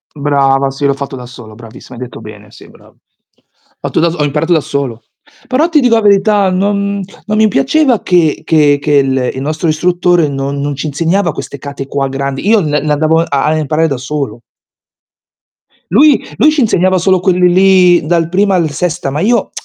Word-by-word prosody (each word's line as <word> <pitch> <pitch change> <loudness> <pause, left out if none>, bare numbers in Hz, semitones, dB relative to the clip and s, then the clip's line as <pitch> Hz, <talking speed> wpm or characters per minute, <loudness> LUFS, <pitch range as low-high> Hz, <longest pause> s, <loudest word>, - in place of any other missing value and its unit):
Brava, 140 -1 +1
sì 140 +1 -4
l'ho 140 - +2
fatto 140 -1 -6
da 125 -1 -9
solo, 120 -3 -13
bravissima, 120 +2 -13
hai 125 - -6
detto 125 - -10
bene, - - -12
sì - - -16
brava. - - -20
Ho - - -39 0.9
fatto - - -1
da 170 +1 +2
so 170 - -7
ho 150 - 0
imparato 150 +4 0
da 160 - +3
solo. 135 -6 -4 0.4
Però 285 +6 +1
ti 310 -3 +3
dico 245 -3 +3
la 225 - +2
verità, 200 -1 +3
non 200 +1 -1 0.2
non 215 0 -2
mi 220 0 +4
piaceva 235 - +1
che 170 -4 +1
che 150 -3 +3
che 145 -1 +2
l 130 -1 -1
il 130 - -6
nostro 155 +3 -2
istruttore 175 0 +1
non 140 0 -4
non 145 0 -3
ci 140 - -5
insegnava 165 +5 0
queste 140 - -8
kata 140 0 -7
qua 140 0 -2
grandi, 135 +5 -4
io 220 -1 +4
l 170 - -2
le 150 +1 -1
andavo 160 +2 +2
a 140 -5 -1
a 155 +1 +1
imparare 155 +2 0
da 140 -4 -3
solo. 135 -2 -5 1.5
Lui 285 +6 +4
lui 305 - +4
ci 300 -3 0
insegnava 185 -4 +2
solo 185 +1 +2
quelli 180 -1 +2
lì 180 -3 +4
dal 165 0 0
primo 195 +2 +1
al 170 -4 +1
sesta, 170 0 -3
ma 145 +3 -3
io 225 +3 0
160 Hz, 200 wpm, -12 LUFS, 140-190 Hz, 1.5 s, mi